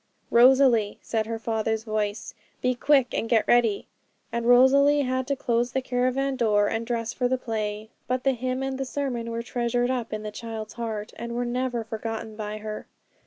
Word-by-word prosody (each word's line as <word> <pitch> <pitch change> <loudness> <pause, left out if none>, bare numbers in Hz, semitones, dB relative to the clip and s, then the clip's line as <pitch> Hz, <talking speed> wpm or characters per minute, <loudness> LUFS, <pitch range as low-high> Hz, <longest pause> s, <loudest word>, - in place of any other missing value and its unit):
"' - - -42
'Rosalie' 240 -3 +5
said 220 -1 -1
her 230 0 -3
father's 220 -1 -1
voice, 215 -2 -3 0.3
'be 255 - +1
quick 265 0 +2
and 225 - -2
get 230 -3 +3
ready' 230 -4 +3 0.5
and 235 0 -2
Rosalie 280 +4 +6
had 260 0 -1
to 280 - 0
close 240 -1 0
the 265 - 0
caravan 255 +2 0
door 210 -4 +3
and 225 +1 -2
dress 230 -1 -2
for 250 - 0
the 260 +1 +1
play. 215 -2 -4 0.2
But 255 0 -1
the 270 - +3
hymn 255 +1 -2
and 270 0 -3
the - - 0
sermon 255 -4 -3
were 230 0 -3
treasured 245 +1 0
up 245 -3 -3
in 215 0 -4
the 210 - -5
child's 220 -1 -7
heart, 220 -3 -5
and 235 0 -5
were 245 0 -1
never 245 -1 -1
forgotten 225 0 -5
by 210 0 -5
her. 215 0 -6
235 Hz, 195 wpm, -26 LUFS, 220-255 Hz, 0.5 s, Rosalie